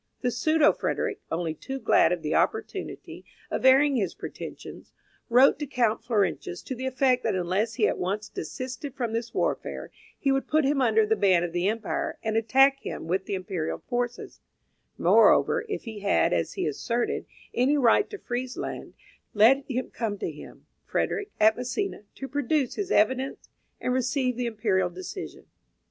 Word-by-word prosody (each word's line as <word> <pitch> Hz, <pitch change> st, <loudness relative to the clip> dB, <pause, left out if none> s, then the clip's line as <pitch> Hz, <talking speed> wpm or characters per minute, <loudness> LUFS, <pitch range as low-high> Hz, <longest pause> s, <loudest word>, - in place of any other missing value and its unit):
The 250 Hz, -, 0 dB
pseudo 310 Hz, +5 st, +3 dB
Frederick, -, -, -2 dB
only 165 Hz, -1 st, -1 dB
too 265 Hz, -, -6 dB
glad -, -, +4 dB
of -, -, -2 dB
the -, -, -1 dB
opportunity -, -, -2 dB, 0.3 s
of -, -, -2 dB
airing 270 Hz, +1 st, +5 dB
his 195 Hz, -7 st, -1 dB
pretensions, -, -, -9 dB, 0.4 s
wrote 255 Hz, +4 st, +5 dB
to 295 Hz, -, -3 dB
Count 235 Hz, -5 st, +1 dB
Florentius 200 Hz, -6 st, -1 dB
to -, -, -5 dB
the 260 Hz, +1 st, -4 dB
effect 260 Hz, -1 st, +2 dB
that 220 Hz, -5 st, 0 dB
unless 185 Hz, +6 st, -1 dB
he 220 Hz, -4 st, +3 dB
at -, -, -2 dB
once 200 Hz, +4 st, -2 dB
desisted 255 Hz, -, -6 dB
from 240 Hz, -5 st, -2 dB
this 230 Hz, 0 st, -3 dB
warfare, -, -, -2 dB, 0.3 s
he 275 Hz, -, +1 dB
would 270 Hz, 0 st, 0 dB
put 310 Hz, -1 st, +2 dB
him 275 Hz, 0 st, +2 dB
under 220 Hz, -3 st, +4 dB
the 220 Hz, +1 st, +2 dB
ban 185 Hz, -4 st, +3 dB
of 175 Hz, -1 st, -4 dB
the 175 Hz, +2 st, 0 dB
empire, 220 Hz, 0 st, -2 dB
and 220 Hz, 0 st, -1 dB
attack 270 Hz, +5 st, +4 dB
him -, -, -6 dB
with 190 Hz, +3 st, -1 dB
the 200 Hz, -, -2 dB
imperial 180 Hz, -4 st, -3 dB
forces; 245 Hz, -1 st, -3 dB, 0.6 s
moreover, -, -, +4 dB
if 410 Hz, -, -3 dB
he 220 Hz, -3 st, -7 dB
had, 90 Hz, -, +2 dB
as 85 Hz, -1 st, -1 dB
he -, -, -2 dB
asserted, 230 Hz, +11 st, -2 dB, 0.3 s
any 265 Hz, +5 st, +2 dB
right 260 Hz, -, +4 dB
to 415 Hz, -, -7 dB
Friesland, 250 Hz, -5 st, -5 dB, 0.4 s
let 245 Hz, +7 st, +6 dB
him 255 Hz, 0 st, -3 dB
come 220 Hz, -3 st, -3 dB
to -, -, -3 dB
him, -, -, -13 dB, 0.2 s
Frederick, 425 Hz, -1 st, -2 dB
at 220 Hz, +1 st, +5 dB
Misina, 250 Hz, -, -3 dB
to 270 Hz, -, -6 dB
produce 285 Hz, -1 st, 0 dB
his 400 Hz, -2 st, -4 dB
evidence 260 Hz, -, +1 dB, 0.3 s
and 250 Hz, -, -1 dB
receive 255 Hz, 0 st, 0 dB
the 245 Hz, 0 st, -2 dB
Imperial 205 Hz, -5 st, 0 dB
decision. 185 Hz, -, -8 dB
240 Hz, 170 wpm, -26 LUFS, 205-270 Hz, 0.6 s, let